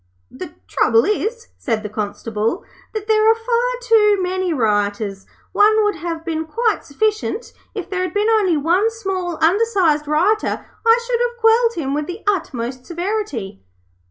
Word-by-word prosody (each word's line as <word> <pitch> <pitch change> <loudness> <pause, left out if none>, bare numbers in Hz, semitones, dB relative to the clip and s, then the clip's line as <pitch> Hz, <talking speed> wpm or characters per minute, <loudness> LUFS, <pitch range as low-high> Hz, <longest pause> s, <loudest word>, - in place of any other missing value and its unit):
'The - - -9
trouble 225 - +3
is,' 460 +3 -2
said 225 -4 -2
the - - -3
Constable, 215 - -3 0.3
'that 435 -2 -5
there 435 0 +4
are 450 - +5
far 475 +2 0
too 425 -3 +4
many 370 0 -1
rioters. 205 -5 -1 0.2
One 430 +1 +4
would 415 -4 0
have 330 0 -5
been 320 -1 -2
quite 455 +5 0
sufficient. 430 - -2 0.2
If 390 -5 -4
there 375 -1 -2
had 370 - -3
been 415 +1 +2
only 415 -7 +3
one 350 +9 +2
small 380 -6 -4
undersized 355 -6 +2
rioter, 365 +9 +1 0.2
I 460 +1 +5
should 475 -1 0
have 480 0 -1
quelled 460 +1 +4
him 275 -5 -2
with 300 +1 -2
the 360 +4 -7
utmost 260 - -2
severity.' 345 - -4
375 Hz, 155 wpm, -19 LUFS, 295-440 Hz, 0.3 s, are